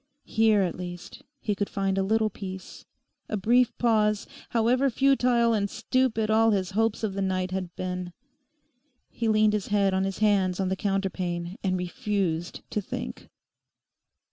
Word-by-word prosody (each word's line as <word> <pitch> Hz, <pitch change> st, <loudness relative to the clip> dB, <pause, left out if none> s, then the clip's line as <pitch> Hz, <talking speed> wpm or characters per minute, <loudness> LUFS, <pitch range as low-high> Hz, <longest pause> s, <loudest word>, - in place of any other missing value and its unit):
Here 220 Hz, -2 st, +3 dB
at 175 Hz, -, -2 dB
least 175 Hz, -1 st, -8 dB, 0.2 s
he 210 Hz, -, -1 dB
could 205 Hz, 0 st, -2 dB
find 195 Hz, -1 st, -1 dB
a 195 Hz, -, +1 dB
little 215 Hz, +2 st, +1 dB
peace, 190 Hz, -2 st, -8 dB, 0.4 s
a 215 Hz, -, -1 dB
brief 240 Hz, +5 st, +3 dB
pause, 215 Hz, -3 st, +2 dB, 0.2 s
however 245 Hz, +4 st, +2 dB
futile 245 Hz, -2 st, +3 dB
and 200 Hz, -2 st, 0 dB
stupid 225 Hz, -4 st, 0 dB
all 225 Hz, +1 st, +4 dB
his 195 Hz, -3 st, 0 dB
hopes 225 Hz, +2 st, 0 dB
of 210 Hz, -3 st, -1 dB
the 195 Hz, -, -3 dB
night 185 Hz, -1 st, -1 dB
had 185 Hz, -2 st, -4 dB
been. 180 Hz, -1 st, -4 dB, 1.0 s
He 230 Hz, -, -2 dB
leant 215 Hz, -1 st, +4 dB
his 210 Hz, -3 st, -1 dB
head 200 Hz, -2 st, +2 dB
on 190 Hz, 0 st, +1 dB
his 195 Hz, 0 st, -2 dB
hands 195 Hz, -4 st, +2 dB
on 190 Hz, -1 st, 0 dB
the 190 Hz, -, 0 dB
counterpane 185 Hz, -3 st, -2 dB
and 185 Hz, -1 st, +1 dB
refused 180 Hz, -3 st, -2 dB
to 210 Hz, -, -1 dB
think. -, -, -6 dB
200 Hz, 160 wpm, -27 LUFS, 185-220 Hz, 1.0 s, all